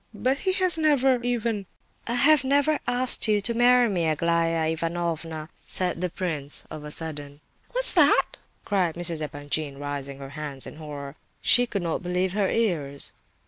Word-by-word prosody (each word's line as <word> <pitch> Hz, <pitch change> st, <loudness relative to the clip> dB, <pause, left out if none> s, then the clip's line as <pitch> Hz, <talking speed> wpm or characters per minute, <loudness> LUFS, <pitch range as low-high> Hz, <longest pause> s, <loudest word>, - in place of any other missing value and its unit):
"But 260 Hz, +6 st, 0 dB
he 375 Hz, -1 st, 0 dB
has 370 Hz, -3 st, +3 dB
never 270 Hz, -5 st, +3 dB
even—" 230 Hz, -5 st, -2 dB, 0.4 s
"I 235 Hz, -, -1 dB
have 285 Hz, +2 st, +5 dB
never 285 Hz, +3 st, +2 dB
asked 245 Hz, -1 st, +3 dB
you 210 Hz, -1 st, +2 dB
to 235 Hz, +4 st, 0 dB
marry 245 Hz, +1 st, +4 dB
me, 175 Hz, -6 st, -1 dB
Aglaya 165 Hz, +1 st, 0 dB
Ivanovna!" 165 Hz, -1 st, -4 dB, 0.2 s
said 180 Hz, -2 st, +1 dB
the 180 Hz, -, -1 dB
prince, 155 Hz, -5 st, -4 dB
of 155 Hz, -, -8 dB
a 150 Hz, -, -7 dB
sudden. 145 Hz, -2 st, -5 dB, 0.3 s
"What?" -, -, +5 dB, 0.3 s
cried 185 Hz, -5 st, 0 dB
Mrs. 170 Hz, -2 st, -2 dB
Epanchin, 145 Hz, 0 st, -4 dB
raising 140 Hz, -1 st, -5 dB
her 135 Hz, -1 st, -9 dB
hands 145 Hz, -3 st, -2 dB
in -, -, -10 dB
horror. 145 Hz, -3 st, -8 dB
"What's 140 Hz, -, -17 dB, 0.2 s
that?" -, -, -12 dB
She 245 Hz, 0 st, +5 dB
could 200 Hz, -5 st, -4 dB
not 165 Hz, -2 st, -2 dB
believe 180 Hz, +1 st, -2 dB
her 200 Hz, -2 st, 0 dB
ears. 155 Hz, -11 st, -1 dB
175 Hz, 170 wpm, -25 LUFS, 155-240 Hz, 0.4 s, have